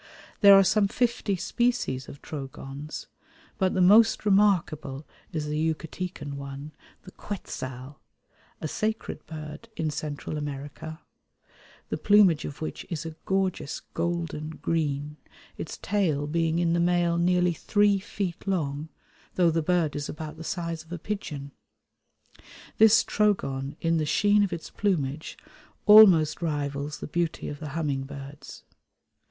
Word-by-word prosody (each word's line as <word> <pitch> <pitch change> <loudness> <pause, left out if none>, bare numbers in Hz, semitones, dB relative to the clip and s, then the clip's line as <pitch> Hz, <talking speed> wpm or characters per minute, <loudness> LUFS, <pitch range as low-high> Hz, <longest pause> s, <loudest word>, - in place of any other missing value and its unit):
There 200 -2 +9
are 195 - +7
some 200 +2 +3
fifty 235 -2 0
species 230 - -1
of 140 - -12
Trogons, 140 0 -7 0.5
but 190 -2 +1
the 185 - +4
most 215 +4 +6
remarkable 165 -9 +2 0.3
is 155 -2 -2
the 150 0 -2 0.2
Yucatecan 165 -2 -6
one, 140 +2 -7 0.3
the 185 - -12
Quetzal, 130 -10 -7 0.6
a - - -3
sacred 220 +7 -3
bird 155 +6 -8
in 155 -1 -1
Central 150 0 -4
America, 145 +2 -6 0.9
the - - -3
plumage 205 -7 +5
of 145 +2 -6
which 155 - -5
is 165 -3 -4
a 160 -1 -6
gorgeous 190 -6 -1
golden 165 -2 -2
green, 150 -2 -2 0.4
its - - -6
tail 170 -8 0
being 165 +1 0
in 170 -1 +2
the 170 - +2
male 175 -1 +2
nearly 180 0 +3
three 205 +4 +2
feet 190 -2 -5
long, 155 -5 -1 0.5
though 175 -2 +4
the 165 +1 +1
bird 165 -2 +1
is 145 -1 -3
about 155 -1 -6
the 160 - -9
size 165 -1 -3
of 160 - -21
a 175 - -3
pigeon. 150 -7 -5 1.3
This 220 +1 +7
Trogon 140 -10 0
in 165 0 +1
the 155 -1 0
sheen 205 +6 +4
of 200 - +1
its 170 -1 -6
plumage 155 -7 -1 0.5
almost 190 -9 +8
rivals 145 -2 -3
the - - -4
beauty 170 +1 -2
of 145 - -6
the 150 - -6
humming 140 -4 -1
birds. 140 +1 -10
165 Hz, 140 wpm, -27 LUFS, 145-190 Hz, 1.3 s, There